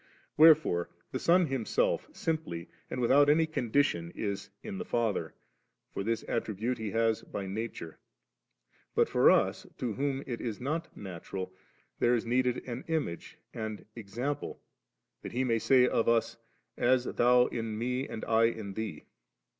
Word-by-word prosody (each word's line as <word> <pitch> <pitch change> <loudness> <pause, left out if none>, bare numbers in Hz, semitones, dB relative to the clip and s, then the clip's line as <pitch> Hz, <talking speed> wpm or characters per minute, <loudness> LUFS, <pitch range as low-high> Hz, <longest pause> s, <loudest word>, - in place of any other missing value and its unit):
Wherdfore 155 - +5 0.2
the - - -2
Sol 175 +1 +4
Himself, 135 -6 0
simply 155 - -3 0.2
and - - -4
without 140 +4 +5
any 160 +2 +5
conditioD 120 - 0
is 100 -2 -3
in 200 -2 -5
the - - -2
Father; 115 - -1 0.6
for - - -3
this 115 +2 -1
attribute 115 +2 -2
He 110 -1 -3
has 115 +1 +1
by 100 - -6
nature; 100 -4 -5 1.0
but - - +4
for - - +5
us, - - +2
to 120 -3 -2
whom 135 +2 -1
it 120 -3 -4
is 115 -4 -4
not 155 +6 -3
natuial, 95 0 -6 0.5
there 120 +1 +4
is 115 - -2
needed 125 +1 0
an 125 +1 -5
image 155 - -3 0.2
and 110 -2 -5
example, 120 +6 -4 0.6
that - - -7
He 125 +2 +1
may 115 -3 +1
say 125 +1 +5
of 115 - +2
us, 115 -1 +2 0.2
' - - -48
As 125 +1 +3
Thou 125 0 +4
in 115 -2 -3
Me, 125 +4 -1
and 110 - -6
I 115 0 +4
in 110 -4 -2
Thee. 105 -7 -5
120 Hz, 155 wpm, -30 LUFS, 110-135 Hz, 1.0 s, Wherdfore